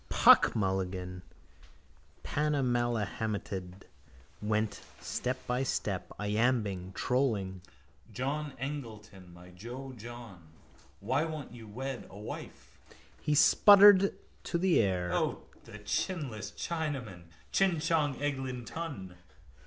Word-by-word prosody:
Puck - - +6
Mulligan, 95 -2 -2 1.0
panamahelmeted, 115 -9 -1 0.6
went 105 0 -1 0.2
step 130 +1 -3
by 125 +1 0
step, 100 -7 -2
iambing, 105 -3 0
trolling: 105 -9 0 0.5
John 140 +5 -3
Eglinton, 110 -9 -7
my 90 +1 -14
jo, 120 +9 -8
John, 115 -7 -10 0.5
Why 130 +9 +1
won't 155 -3 -6
you 115 -2 -11
wed 130 +4 -5
a 100 - -12
wife? 105 - -9 0.4
He 150 0 +1
spluttered 200 +4 +7 0.3
to 170 - -1
the 180 0 +3
air: 90 -4 +1
—O, - - 0 0.2
the - - -10
chinless 145 - -3
Chinaman! 135 - -4 0.3
Chin 190 -4 +2
Chon 155 -3 +1
Eg 145 -1 -1
Lin 125 -2 -5
Ton. 120 - -6
120 Hz, 105 wpm, -31 LUFS, 100-145 Hz, 1.0 s, spluttered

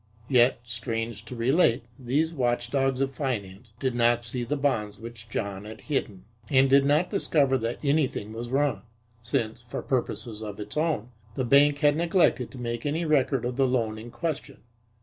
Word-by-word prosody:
Yet, 125 -2 +4
strange 115 -1 -4
to 125 - -8
relate, 120 0 +3 0.2
these 145 +6 0
watchdogs 130 0 0
of 135 0 0
finance, 110 -5 -4
did 130 -2 0
not 120 0 +2
see 120 +1 -3
the 145 +5 -2
bonds 110 -8 0
which 115 -1 -10
John 100 -2 -3
had 110 +1 -9
hidden, 105 -10 -3 0.2
and 135 0 +5
did 135 +1 +5
not 150 +5 +2
discover 145 -9 +2
that 115 +1 -2
anything 140 -7 0
was 120 +1 -5
wrong, 135 -5 +1 0.4
since, 115 -1 -2
for 120 0 -6
purposes 120 -3 -2
of 105 -2 -6
its 105 0 -7
own, 150 -7 0 0.2
the 130 - -1
bank 140 +3 +5
had 145 -1 +5
neglected 170 -6 +2
to 135 - -11
make 120 -1 -4
any 155 +4 -1
record 135 -5 +2
of 125 +1 -3
the 135 -1 +3
loan 115 -4 0
in 115 +2 -9
question. 160 -4 -5
125 Hz, 175 wpm, -27 LUFS, 115-140 Hz, 0.4 s, and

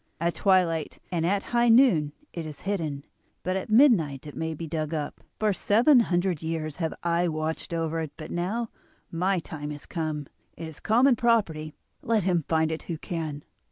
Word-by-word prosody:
At 170 +1 +1
twilight 175 -5 +2
and 170 -2 0
at 195 +2 +1
high 240 0 +4
noon 225 - +5 0.2
it 170 - -4
is 155 -2 -8
hidden, 160 -8 -3 0.4
but 185 +1 -1
at 190 - -3
midnight 215 - +4
it 145 -4 -9
may 160 +2 -3
be 165 - -6
dug 155 0 -3
up. 150 -2 -4 0.2
For 215 -1 +2
seven 240 +9 +5
hundred 180 -6 +1
years 160 -2 -3
have 165 -3 -2
I 170 +1 +2
watched 155 0 -3
over 165 -1 -1
it, 160 -3 -4
but 155 -1 -8
now 210 +7 -2 0.4
my 185 +3 +1
time 155 -3 -5
has 145 -1 -7
come; 155 -3 -3 0.3
it 165 - -6
is 160 -2 -10
common 245 +4 +4
property, 170 -11 +1 0.3
let 220 -3 +1
him 175 -4 +1
find 160 -1 +2
it 160 - -3
who 165 - -2
can. 155 -3 -4
165 Hz, 185 wpm, -27 LUFS, 155-195 Hz, 0.4 s, noon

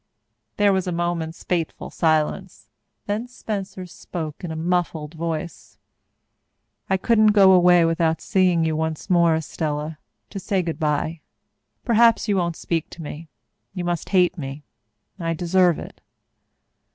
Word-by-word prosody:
There 205 -1 +4
was 190 -1 -1
a - - -1
moment's 170 -1 -3
fateful 170 -3 -3
silence. 160 +4 -1 0.4
Then 210 +4 -2
Spencer 200 -6 -5
spoke 165 -3 -7
in 175 - -4
a 160 - -4
muffled 165 -2 -1
voice. 165 0 -5 1.1
"I 190 - +3
couldn't 215 +1 +4
go 195 -2 +7
away 180 -2 +6
without 165 -1 +1
seeing 180 -4 +2
you 160 -1 0
once 160 +3 -3
more, 170 -2 +4
Estella, 155 0 -3 0.3
to 200 - -5
say 190 -1 -1
good 165 -2 -4
bye. 155 +1 -1 0.6
Perhaps 230 0 +4
you 205 -2 +2
won't 170 -2 0
speak 165 -1 -2
to 165 - -10
me. 155 +2 -8 0.5
You 180 - -3
must 175 -1 -2
hate 180 -2 +2
me. 140 +1 -6 0.6
I 165 -1 -1
deserve 175 0 +3
it." - - -10
170 Hz, 140 wpm, -23 LUFS, 160-190 Hz, 1.1 s, go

